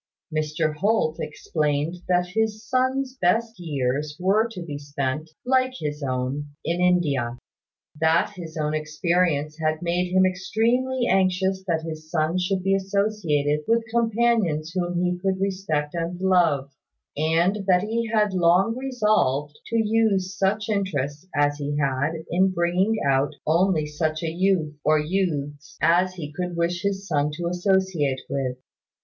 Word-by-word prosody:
Mr 155 0 0
Holt 180 -4 +1
explained 150 +1 -1
that 180 0 +2
his 220 +2 -1
son's 260 +1 0
best 225 +5 +1
years 145 -2 -2
were 200 +5 +3
to 185 -6 -7
be 145 -4 -6
spent, 145 +1 -3 0.2
like 255 0 +2
his 150 -1 -4
own, 130 +2 -2 0.2
in 170 +2 0
India; 145 -10 +1 0.6
that 160 +3 +3
his 165 -3 -8
own 150 0 -1
experience 155 0 0
had 155 +1 -1
made 175 +1 0
him 185 0 +4
extremely 235 +7 0
anxious 190 0 +1
that 165 -2 0
his 155 -1 -7
son 160 +2 0
should 185 0 -1
be 195 +1 +2
associated 190 -7 0
with 230 0 +2
companions 225 -9 +1
whom 175 -1 -1
he 180 0 0
could 190 0 -1
respect 185 -7 -1
and 170 +1 -3
love; 170 -8 +2 0.4
and 170 +7 +1
that 180 0 +4
he 230 +2 -1
had 210 -3 +2
long 185 +5 +3
resolved 210 - +1
to 230 - -1
use 210 -4 +1
such 200 +2 0
interest 180 -7 -2
as 145 0 +2
he 145 0 -2
had 140 +1 0 0.2
in 185 +3 +3
bringing 185 +4 +1
out 140 +2 +2
only 165 0 +2
such 155 +1 -2
a 165 - -1
youth, 175 -3 +1
or 155 0 +4
youths, 150 -4 -2
as 175 +5 +3
he 150 -4 -7
could 180 0 -4
wish 170 +1 0
his 200 0 -2
son 150 -3 +1
to 170 +3 -5
associate 180 -6 +1
with. 130 -2 -2
175 Hz, 145 wpm, -24 LUFS, 150-195 Hz, 0.6 s, him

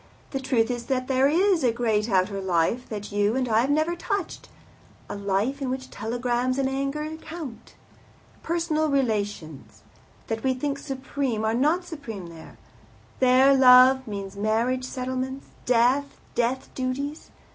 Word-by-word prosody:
The 270 - -2
truth 250 -3 +1
is 240 -1 -5
that 255 -2 -1
there 265 0 +3
is 350 +2 +3
a 245 - +4
great 225 -2 0
outer 195 0 +1
life 190 +7 0
that 210 -1 -6
you 205 +2 +1
and 260 -1 0
I 225 -1 +3
have 260 - -1
never 310 +4 +1
touched 385 +1 -4 0.6
a - - -5
life 200 +7 -1
in 265 - -2
which 260 0 -5
telegrams 245 +3 -1
and 270 -1 +1
anger 275 +3 -2
count. 310 -8 -9 0.7
Personal 320 -2 0
relations, 205 - -2 0.4
that 225 0 -4
we 260 -1 +1
think 280 +2 -2
supreme, 265 -5 -3
are 220 - +1
not 305 +9 +1
supreme 230 - -7
there. 165 -1 -13 0.6
There 260 +2 +5
love 260 0 +7
means 200 -2 -6
marriage 230 +5 0
settlements, 260 +1 -4 0.2
death, 255 +4 +2
death 245 +2 -1
duties. 275 +4 -4
255 Hz, 145 wpm, -25 LUFS, 225-275 Hz, 0.7 s, love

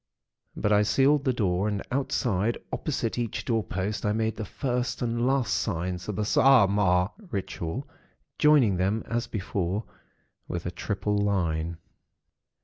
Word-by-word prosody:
But 105 - +1
I 105 - +5
sealed 135 +7 +3
the 130 - +3
door, 100 -4 0
and 105 -2 -2
outside, 120 -5 0 0.2
opposite 125 -6 -2
each 115 -3 -3
door 115 -3 +1
post, 95 +3 -3
I 105 - +1
made 110 0 0
the 110 - -4
First 125 +2 -2
and 120 +1 0
Last 135 -2 +1
Signs 90 -1 -2
of 105 - -2
the 105 - -1
Saaamaaa 100 -6 +4 0.2
Ritual, 100 - -4 0.5
joining 140 - +5
them, 100 +4 0
as 120 0 -2
before, 100 -1 -2 0.6
with 85 -1 -4
a 85 - -2
triple 105 +2 -2
line. 85 -5 0
105 Hz, 140 wpm, -27 LUFS, 95-120 Hz, 0.6 s, I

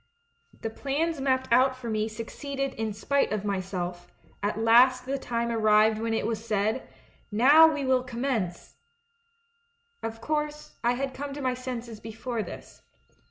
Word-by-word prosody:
The 225 - -3
plans 285 +5 -1
mapped 260 -2 +1
out 260 +1 +5
for 250 -2 -8
me 215 -1 0
succeeded 275 +5 -4
in 220 0 -3
spite 275 +6 0
of 210 -1 -2
myself; 180 -3 -3 0.3
at 205 +1 -1
last 250 +3 +5
the 275 +1 -2
time 235 -2 -2
arrived 215 -1 +4
when 225 0 -1
it - - -1
was 225 -1 -2
said, 215 +2 -1 0.4
'Xow 290 +9 +7
we 290 -3 -2
will 260 -1 +3
commence 235 -8 -3 0.6
!' 465 0 -44
"Of 225 0 -5
course, 300 +1 -3
I 240 +1 +3
had 265 +1 -3
come 280 +1 -5
to 290 - -6
my 255 -1 +1
senses 245 -3 -6
before 225 +2 -4
this. - - -9
245 Hz, 160 wpm, -27 LUFS, 220-275 Hz, 0.6 s, Xow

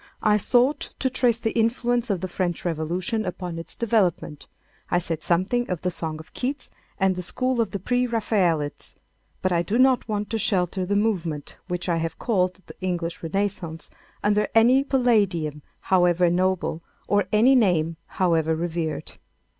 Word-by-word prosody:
I 210 -1 +4
sought 250 +7 +2
to 260 - 0
trace 245 -3 +2
the 225 -1 -1
influence 240 +1 +1
of 190 -4 0
the 185 - -2
French 175 -1 -3
Revolution 175 +7 -1
upon 180 -3 -5
its 165 -1 -6
development. 200 -10 0 0.4
I - - +2
said 165 -2 -2
something 185 +10 +1
of 180 -3 -3
the 180 - 0
song 160 -2 -4
of 160 +1 -13
Keats 265 +2 -4 0.3
and 190 -1 +2
the 180 - -4
school 255 +6 -1
of 220 - 0
the - - -3
pre 245 +6 0
Raphaelites. 185 -10 0 0.5
But 185 - +1
I 170 -1 +2
do 200 +7 -1
not 255 -2 +3
want 210 0 -2
to 225 - 0
shelter 185 -2 0
the 205 - +1
movement, 175 -9 -1
which 180 -1 -3
I 170 -2 +1
have 165 -1 -3
called 185 -4 0
the - - -12
English 175 -2 -2
Renaissance, 170 -2 -3 0.3
under 210 0 +2
any 245 +4 +6
palladium 200 - +1 0.2
however 175 -1 +3
noble, 180 -2 0 0.3
or 205 -2 +2
any 230 +5 +5
name 175 -9 +3
however 165 -3 +1
revered. 165 -1 -3
185 Hz, 165 wpm, -24 LUFS, 170-225 Hz, 0.5 s, any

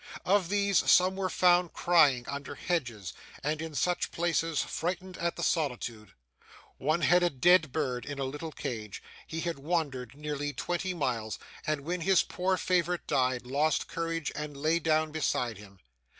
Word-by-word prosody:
Of 190 -2 +3
these, 200 -1 +3
some 185 +1 +5
were 190 -1 -1
found 180 -1 +3
crying 145 -8 +4
under 140 0 -5
hedges 120 - -3 0.3
and 150 +2 -1
in 160 -2 -6
such 175 +6 0
places, 165 -2 0
frightened 180 +2 -3
at 170 0 -1
the - - -4
solitude. 120 - -2 0.7
One 155 +5 +1
had 175 +3 +5
a 175 - +3
dead 165 +1 +4
bird 130 -5 -2
in 145 -1 -5
a 135 - -2
little 150 +4 -5
cage; 110 -7 -6 0.2
he 165 +1 -4
had 170 -4 -3
wandered 140 -5 -2
nearly 145 -1 -3
twenty 175 +6 -2
miles, 120 -8 -2 0.3
and 155 -2 0
when 170 +4 -3
his 190 +2 +4
poor 185 +1 -1
favourite 180 -1 0
died, 130 -2 +1
lost 145 +4 +1
courage, 165 -2 -3
and 150 -1 -6
lay 155 +4 +2
down 155 -1 +1
beside 125 -7 -1
him. 100 -1 -14
155 Hz, 165 wpm, -30 LUFS, 135-175 Hz, 0.7 s, some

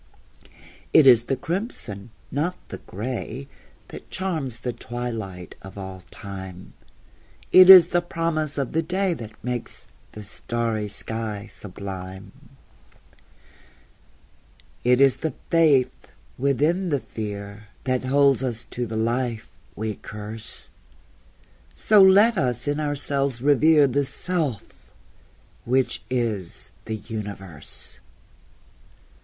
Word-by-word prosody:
It 155 - +7
is 120 -3 +7
the 135 - 0
crimson, 130 - -5 0.2
not 160 +6 -1
the - - -7
gray, 125 +5 -5 0.4
That - - -10
charms 155 -11 -3
the 125 - -2
twilight 110 -8 -6
of 95 +1 -11
all 95 -1 -7
time; 95 -2 -9 0.8
It 185 0 +9
is 180 -3 +11
the 175 - +2
promise 165 -3 -2
of 135 -3 -1
the 165 - +1
day 185 +2 0
That 115 -9 -7
makes 125 -1 -4 0.3
the 105 - -8
starry 110 0 -2
sky 105 0 -5
sublime; 95 -1 -7 2.5
It 125 +1 +4
is 135 -1 +5
the 160 -5 -3 0.2
faith 155 -6 +3 0.3
within 150 +8 +1
the 145 -3 +1
fear 105 -2 -7 0.2
That 130 -1 -1
holds 140 -1 +4
us 120 -3 -3
to 120 -1 -3
the 110 0 -4
life 115 0 -1 0.3
we 110 -1 -3
curse; 105 +2 -6 1.0
So 210 -2 +5
let 200 +3 +6
us 125 -1 -1
in 145 +1 0
ourselves 140 -3 -1
revere 145 +3 +5
The 140 +1 +1
Self 155 - -3 0.7
which 130 +2 +1
is 115 -8 -3
the 110 - -3
Universe! 100 -7 -7
125 Hz, 110 wpm, -24 LUFS, 105-150 Hz, 2.5 s, is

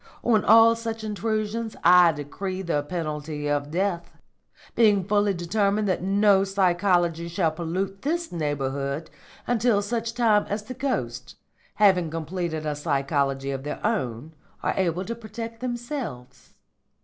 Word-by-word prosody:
On 225 -3 +3
all 225 +1 +7
such 225 -1 -5
intrusions 215 +1 -2
I 175 0 +7
decree 185 +6 -5
the 170 -5 0
penalty 150 -2 -4
of 145 0 -1
death, 175 0 -2 0.6
being 210 -4 +4
fully 205 +1 +2
determined 200 +4 0
that 185 - 0
no 195 +1 +4
psychology 175 -3 +1
shall 170 -1 0
pollute 185 +4 -3
this 335 +4 -2
neighbourhood 140 -2 -3 0.3
until 235 -3 +2
such 230 +2 -3
time 220 -4 +3
as 205 +1 -2
the 255 - -7
ghosts, 130 - -3 0.4
having 185 -5 +4
completed 165 0 -4
a 150 -1 -1
psychology 140 -2 -1
of 135 -1 -4
their 150 - -5
own, 155 - -2 0.3
are - - +1
able 185 0 0
to 230 - -3
protect 230 0 -8
themselves. 240 - -6
185 Hz, 135 wpm, -25 LUFS, 155-215 Hz, 0.6 s, all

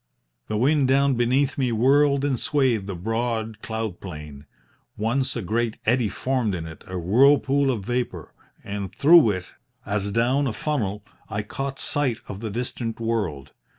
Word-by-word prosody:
"The 105 - -2
wind 140 +3 +3
down 140 +1 +3
beneath 130 +4 +1
me 125 -3 +1
whirled 140 +4 +3
and 135 -4 0
swayed 130 -10 +1
the 100 - -4
broad 110 +2 -2
cloud 110 -4 -4
plain. 75 -5 -9 0.5
Once 130 +5 0
a 115 - -3
great 115 +3 -1
eddy 120 -1 +2
formed 125 -2 -1
in 80 -2 -5
it, 80 0 -10
a 95 - -5
whirlpool 135 +8 +4
of 110 -7 -2
vapour, 120 -9 -3 0.3
and 100 -1 -5
through 155 -4 +6
it, 95 -3 -2 0.4
as 100 -1 -2
down 125 +6 +2
a 115 - -2
funnel, 105 -8 -2 0.2
I 105 0 -2
caught 135 +5 -5
sight 135 -6 -1
of 100 - -7
the 110 0 -4
distant 115 +1 -4
world. 100 - -2
115 Hz, 160 wpm, -24 LUFS, 100-135 Hz, 0.5 s, through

